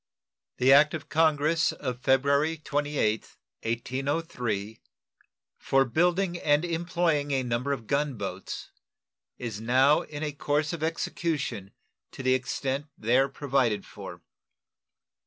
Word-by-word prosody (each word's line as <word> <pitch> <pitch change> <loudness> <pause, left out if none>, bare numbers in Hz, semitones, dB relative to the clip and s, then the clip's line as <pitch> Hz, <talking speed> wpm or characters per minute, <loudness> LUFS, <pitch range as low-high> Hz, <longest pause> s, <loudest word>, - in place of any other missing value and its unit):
The 130 +2 +5
act 150 +3 +6
of 155 - -8
Congress 155 +1 +3
of 125 -3 -5
February 140 +5 +2
28th, 145 -7 -1 0.2
1803, 120 -3 -3 0.8
for 135 0 +3
building 175 +6 +1
and 145 +3 +2
employing 170 -3 0
a 135 -2 +1
number 125 +3 -1
of 130 -5 -3
gun 140 +3 0
boats, 95 -3 -6 0.7
is 110 -4 -5
now 130 +6 +4
in 150 0 -7
a 150 - -1
course 150 +2 -1
of 165 - -5
execution 160 - -2 0.4
to 135 - -7
the 130 0 +3
extent 135 +2 -2
there 125 +5 +2
provided 135 -7 0
for. - - -10
140 Hz, 120 wpm, -27 LUFS, 125-155 Hz, 0.8 s, act